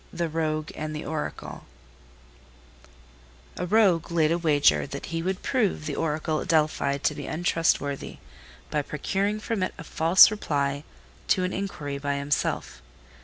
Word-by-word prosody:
THE 170 -1 -2
ROGUE 155 -1 -2
AND 155 0 -4
THE 150 - -5
ORACLE 155 0 -5 1.9
A 180 - -3
Rogue 190 -5 +3
laid 160 -2 +3
a 170 - +2
wager 150 -4 +3
that 140 0 -6
he 165 - -1
would 185 +2 -3
prove 215 - 0
the 145 -2 -3
Oracle 155 0 -1
at - - -6
Delphi 155 -3 +2
to 140 - 0
be - - -7
untrustworthy 160 -4 0 0.5
by 150 - +1
procuring 195 +9 -2
from 215 -1 -2
it 185 - -2
a - - -8
false 165 +5 +6
reply 145 -8 -1 0.4
to 185 - +2
an 185 - -1
inquiry 150 -8 -4
by 140 0 -1
himself. 140 0 -2
160 Hz, 150 wpm, -26 LUFS, 145-180 Hz, 1.9 s, false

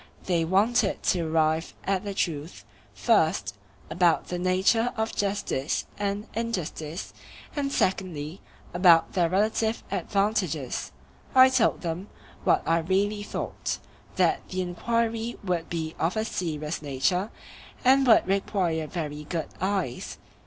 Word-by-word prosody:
They 170 -3 +1
wanted 200 +4 +2
to 180 - +2
arrive 160 0 +1
at 190 -1 0
the 200 -1 -5
truth, 160 -3 -3 0.3
first, 160 - +2 0.3
about 175 -2 +2
the 180 - -2
nature 190 +6 +2
of 220 0 -1
justice 195 -8 -1
and 205 +1 -2
injustice, 180 -7 -4 0.4
and 280 -2 -1
secondly, 180 - -1 0.3
about 175 -2 +5
their 175 -3 +2
relative 220 +4 +1
advantages. 195 - -1 0.4
I 260 0 +9
told 260 -3 +2
them, 175 +3 -4 0.4
what - - +3
I 165 +1 +3
really 195 +5 0
thought, 205 - -4 0.4
that - - +2
the 185 0 -2
enquiry 230 +5 -1
would 175 -4 -1
be 160 -2 -3
of 170 +6 0
a 220 - 0
serious 155 -6 -3
nature, 155 +8 0 0.6
and 265 +1 +5
would 225 - +6
require 185 -5 0
very 150 -3 -5
good 165 0 -3
eyes. 190 -10 -2
185 Hz, 125 wpm, -27 LUFS, 165-210 Hz, 0.6 s, I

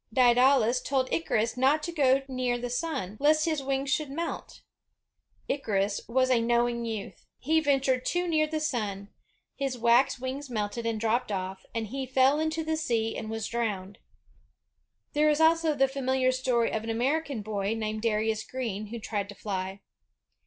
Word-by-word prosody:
Daedalus 250 0 +4
told 265 -2 -1
Icarus 230 -9 0
not 275 +4 +3
to 340 - -3
go 275 -4 +3
near 255 -2 -1
the 245 0 -5
sun, 245 - -3
lest 305 +2 +4
his 310 -3 0
wings 275 0 -1
should 300 0 0
melt. 335 +5 -5 0.9
Icarus 205 -7 0
was 255 +2 +2
a 240 -2 +4
knowing 235 0 +1
youth. 220 -3 -6
He 320 +4 +2
ventured 270 -4 +1
too 355 +4 0
near 310 -2 +2
the 310 0 -2
sun, 210 -9 -3 0.5
his 270 -2 -2
wax 240 +4 +4
wings 260 +2 -5
melted 225 0 -3
and 225 -1 -1
dropped 225 +1 0
off, 190 -1 -4
and 225 -2 -2
he 265 +2 -4
fell 265 +3 +3
into 315 +1 -1
the 315 0 -1
sea 230 -7 -1
and 215 - -5
was 225 -1 -3
drowned. 205 -5 -3 1.1
There 300 +1 +4
is 300 0 +2
also 320 -1 +4
the 270 -1 +4
famihar 260 -1 0
story 255 -2 +1
of 220 - -2
an 225 - -5
American 265 +1 -1
boy, 205 0 -2
named 215 -1 -3
Darius 220 -1 0
Green, 220 -4 -4
who 235 +3 -6
tried 205 -3 -3
to 205 - -9
fly. 195 -1 -4
250 Hz, 170 wpm, -28 LUFS, 220-275 Hz, 1.1 s, Daedalus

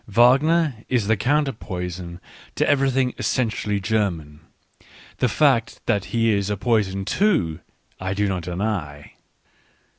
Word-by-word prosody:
Wagner 135 +6 +4
is 125 -5 +1
the 110 +2 +2
counter 140 +7 +1
poison 90 -5 -6 0.4
to - - +1
everything 135 -2 +2
essentially 110 -4 -1
German 90 -8 -2 0.4
— - - -23
the 125 - +2
fact 130 -2 +2
that 100 -1 0
he 115 -1 +1
is 100 -1 0
a 105 - -1
poison 100 -3 0
too, 105 - +1 0.4
I 95 +1 -3
do 105 0 +1
not 95 -2 -2
deny. 85 -5 -4
105 Hz, 130 wpm, -22 LUFS, 95-125 Hz, 0.4 s, Wagner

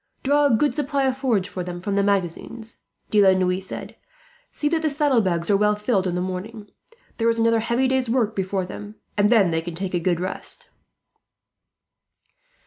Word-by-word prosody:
"Draw 290 +2 +3
a 250 - +3
good 290 +6 +2
supply 285 -1 -1
of 260 -1 +1
forage 235 -8 +1
for 185 -3 -5
them 175 0 -6
from 200 +3 -3
the 200 - +2
magazines," 200 +3 -2 0.3
De 210 - +5
la 190 -1 +5
Noue 185 0 +1
said. 190 - -8 0.6
"See 295 - -2
that 320 +1 +1
the 315 - +1
saddlebags 230 - +1
are 200 - +5
well 210 +1 +3
filled 210 -3 0
in 175 - -2
the 180 - -1
morning. 200 +3 -6 0.5
There 230 0 +2
is 230 - +1
another 230 0 +3
heavy 235 +3 +1
day's 260 -2 0
work 225 -3 +1
before 190 -1 -1
them, 205 +3 -9 0.2
and 205 0 +3
then 200 -7 +5
they 160 0 0
can 170 0 -7
take 185 +1 -4
a 175 - +1
good 175 0 0
rest." 185 +1 -3
210 Hz, 195 wpm, -23 LUFS, 185-240 Hz, 0.6 s, De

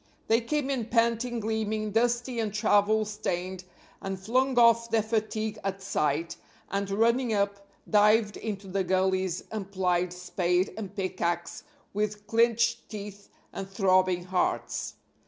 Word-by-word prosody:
They 225 +2 +4
came 280 +3 -1
in 240 -5 -2
panting, 235 +1 +1
gleaming, 215 0 -1
dusty 240 +2 +1
and 220 -2 -1
travel 210 0 +3
stained 185 -3 -4 0.4
and 195 -1 -4
flung 255 +6 +1
off 230 -1 +5
their 225 -1 +2
fatigue 220 -1 -2
at 195 0 -2
sight, 165 -3 -1 0.3
and, 200 0 -1
running 230 +3 +2
up, 200 0 -1 0.2
dived 210 0 +4
into 205 -3 -5
the 190 +1 -1
gullies 185 -1 0
and 200 -3 -5
plied 180 -2 +1
spade 180 +1 0
and 200 -3 -7
pickax 175 -3 -2 0.3
with 210 0 -2
clinched 230 +1 +2
teeth 205 -1 -8 0.2
and 195 0 -6
throbbing 185 -2 +2
hearts. 180 0 -1
205 Hz, 135 wpm, -28 LUFS, 190-225 Hz, 0.4 s, off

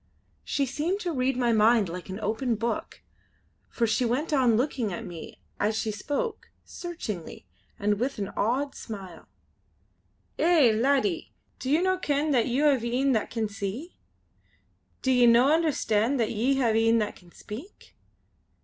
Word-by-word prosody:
She 280 - 0
seemed 305 +9 -2
to 350 - -2
read 260 -3 0
my 240 -2 +2
mind 220 -1 +4
like 175 +2 -7
an 190 +2 -5
open 225 +3 0
book, 230 +2 -4 0.7
for 235 - 0
she 225 +3 +1
went 255 +7 -1
on 250 -6 +4
looking 245 -4 -1
at 175 - -5
me 170 -3 -10 0.2
as 215 +1 +1
she 220 - -1
spoke, 295 - -3 0.2
searchingly 220 - -7 0.3
and 205 0 0
with 265 +3 -1
an 200 -2 -3
odd 265 +6 -1
smile. 190 -7 -9 1.1
"Eh! 325 -8 +5
laddie, 220 - +1 0.3
do 260 - -4
ye 300 +3 +4
no 375 0 +1
ken 295 -1 0
that 245 -5 +2
ye 255 +4 0
hae 255 -5 +2
een 275 0 +3
that 220 -4 0
can 225 -2 -2
see? 205 - -6 1.1
Do 260 - +2
ye 250 -1 +5
no 245 +5 +6
understand 275 -6 +1
that 225 - +1
ye 240 +5 +1
hae 225 -3 +2
een 230 - +4
that 210 -2 -1
can 175 -2 -18
speak? 260 - -11
240 Hz, 160 wpm, -27 LUFS, 215-280 Hz, 1.1 s, no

